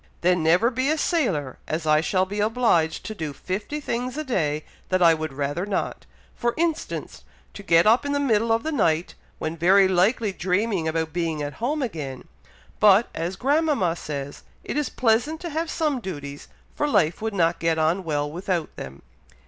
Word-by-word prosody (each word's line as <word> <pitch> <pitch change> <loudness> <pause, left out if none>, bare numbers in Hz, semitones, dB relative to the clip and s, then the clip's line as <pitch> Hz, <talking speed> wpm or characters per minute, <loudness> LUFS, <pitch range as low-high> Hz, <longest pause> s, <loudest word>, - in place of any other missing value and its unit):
"Then 180 0 +3
never 175 +10 +3
be 260 +3 0
a 310 - +2
sailor, 190 - 0
as 160 +1 -3
I 155 0 +4
shall 185 +4 +1
be 205 +2 -5
obliged 210 -8 +1
to 220 - -4
do 160 -8 -5
fifty 205 - -4
things 250 -1 -3
a 310 - -2
day 155 - -1 0.2
that 185 -1 +2
I 165 -1 +7
would 155 -2 -3
rather 145 +5 -2
not; 200 -1 -3 0.3
for 235 0 -1
instance, 330 -1 -2 0.3
to - - -9
get 170 -3 +4
up 225 +5 +5
in 285 - -2
the 285 - +1
middle 230 -5 +2
of 225 0 +2
the 315 - -2
night, 170 - +1 0.2
when 155 +1 -3
very 190 +4 +5
likely 200 +4 +2
dreaming 190 -1 0
about 160 -1 -2
being 165 -3 -1
at 145 0 -4
home 285 +4 0
again; 150 - -5 0.5
but, 210 +2 +5
as 170 +3 -3
grandmama 280 - +1
says, 140 -4 -6 0.2
it - - -5
is 295 -2 0
pleasant 245 +7 +1
to 340 - -5
have 320 +2 -2
some 305 -6 0
duties, 145 -9 -7 0.3
for 295 - -1
life 165 - +2
would 220 -1 -3
not 170 -2 +2
get 165 -1 +1
on 160 +4 +1
well 145 -3 -1
without 175 +1 -3
them." 65 +1 -9
185 Hz, 190 wpm, -24 LUFS, 160-240 Hz, 0.5 s, I